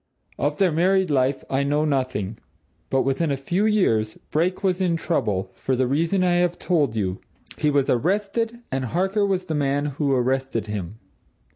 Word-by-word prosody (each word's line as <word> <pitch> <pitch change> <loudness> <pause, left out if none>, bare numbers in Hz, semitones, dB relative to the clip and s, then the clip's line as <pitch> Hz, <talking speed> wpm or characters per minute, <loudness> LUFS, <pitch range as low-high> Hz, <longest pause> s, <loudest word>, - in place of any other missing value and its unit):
Of 145 +1 0
their 190 -3 +3
married 185 +2 +2
life, 135 0 +1
I 135 +1 0
know 145 +2 +1
nothing. 130 -8 -1 0.5
But 135 0 +2
within 135 +4 0
a 140 - 0
few 175 +10 0
years, 110 - +2 0.2
Brake 180 +6 0
was 185 -1 +1
in 175 -3 +2
trouble, 95 - -1
for 130 - -1
the 130 +1 +1
reason 165 +8 +1
I 175 -1 +3
have 175 0 +1
told 150 - +1
you. 95 -3 -1 0.4
He 150 - +2
was 140 -2 +2
arrested 205 - 0
and 130 0 -1
Harker 190 - +1
was 185 -2 -1
the 160 - -3
man 145 -1 0
who 145 0 -1
arrested 130 -3 0
him." 105 -1 -5
145 Hz, 175 wpm, -23 LUFS, 130-180 Hz, 0.5 s, their